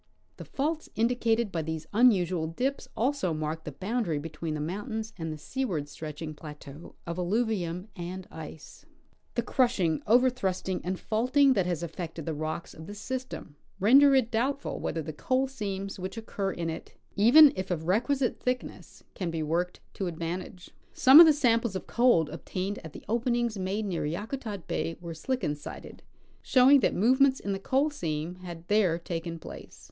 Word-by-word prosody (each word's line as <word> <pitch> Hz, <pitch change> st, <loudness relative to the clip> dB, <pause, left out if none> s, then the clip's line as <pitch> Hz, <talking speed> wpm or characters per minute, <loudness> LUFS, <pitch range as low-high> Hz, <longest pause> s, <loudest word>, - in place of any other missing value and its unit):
The -, -, -8 dB
faults 310 Hz, +3 st, -2 dB
indicated 230 Hz, -1 st, +1 dB
by 165 Hz, -, -1 dB
these 160 Hz, 0 st, -4 dB
unusual 185 Hz, -8 st, +3 dB
dips 255 Hz, +12 st, -2 dB
also 255 Hz, -, 0 dB
mark 155 Hz, +1 st, -4 dB
the 150 Hz, -, -5 dB
boundary 195 Hz, -, -2 dB
between 155 Hz, +1 st, -4 dB
the -, -, -4 dB
mountains 220 Hz, -, -4 dB
and 160 Hz, -3 st, -4 dB
the 155 Hz, -, -5 dB
seaward 180 Hz, -, -3 dB
stretching 155 Hz, +1 st, -7 dB
plateau 150 Hz, 0 st, -11 dB
of 170 Hz, +1 st, -4 dB
alluvium 185 Hz, -2 st, -1 dB
and 180 Hz, +1 st, -6 dB
ice. 160 Hz, -1 st, -10 dB, 0.5 s
The 235 Hz, -, 0 dB
crushing, 230 Hz, -, +1 dB
overthrusting 220 Hz, -6 st, +2 dB
and 185 Hz, +1 st, -3 dB
faulting 255 Hz, +5 st, +3 dB
that 190 Hz, -6 st, +1 dB
has 175 Hz, -2 st, -2 dB
affected 165 Hz, -1 st, -6 dB
the 160 Hz, -, -2 dB
rocks 155 Hz, +2 st, -4 dB
of 160 Hz, +1 st, -11 dB
this 205 Hz, -, -8 dB
system 255 Hz, -, -6 dB, 0.2 s
render 270 Hz, +7 st, +7 dB
it 250 Hz, -3 st, +2 dB
doubtful 260 Hz, +5 st, -1 dB
whether 160 Hz, -, -3 dB
the 155 Hz, +1 st, -6 dB
coal 260 Hz, -, 0 dB
seams 200 Hz, -6 st, -5 dB
which 185 Hz, +3 st, -5 dB
occur 200 Hz, -3 st, -3 dB
in 165 Hz, -2 st, -3 dB
it, 160 Hz, -, -9 dB, 0.2 s
even 270 Hz, +9 st, +8 dB
if 185 Hz, 0 st, -4 dB
of 165 Hz, -3 st, -2 dB
requisite 245 Hz, -, +1 dB
thickness, 250 Hz, 0 st, -4 dB
can 180 Hz, -3 st, -3 dB
be 165 Hz, -1 st, -2 dB
worked 170 Hz, +4 st, -1 dB
to 190 Hz, -, -3 dB
advantage. 175 Hz, +3 st, -5 dB, 0.2 s
Some 270 Hz, +4 st, +8 dB
of 335 Hz, -, +11 dB
the -, -, +8 dB
samples 235 Hz, -7 st, +2 dB
of 190 Hz, -, -4 dB
coal 235 Hz, -10 st, +3 dB
obtained 185 Hz, +4 st, -4 dB
at 160 Hz, -2 st, -10 dB
the -, -, -11 dB
open 235 Hz, +2 st, +1 dB
ings 240 Hz, -2 st, 0 dB
made 195 Hz, +3 st, -2 dB
near 175 Hz, -6 st, -2 dB
Yakutat 205 Hz, -, -5 dB
bay 165 Hz, -, -2 dB
were 170 Hz, -1 st, -7 dB
slickensided, 160 Hz, -, -4 dB, 0.4 s
showing 265 Hz, +2 st, +6 dB
that -, -, +1 dB
moyements 260 Hz, +6 st, +4 dB
in 200 Hz, -, -4 dB
the 195 Hz, -, -3 dB
coal 275 Hz, +8 st, +1 dB
seam 165 Hz, -, -4 dB
had 175 Hz, -2 st, -9 dB
there 200 Hz, -6 st, +3 dB
taken 170 Hz, -1 st, -5 dB
place. -, -, -11 dB
190 Hz, 170 wpm, -28 LUFS, 165-245 Hz, 0.5 s, of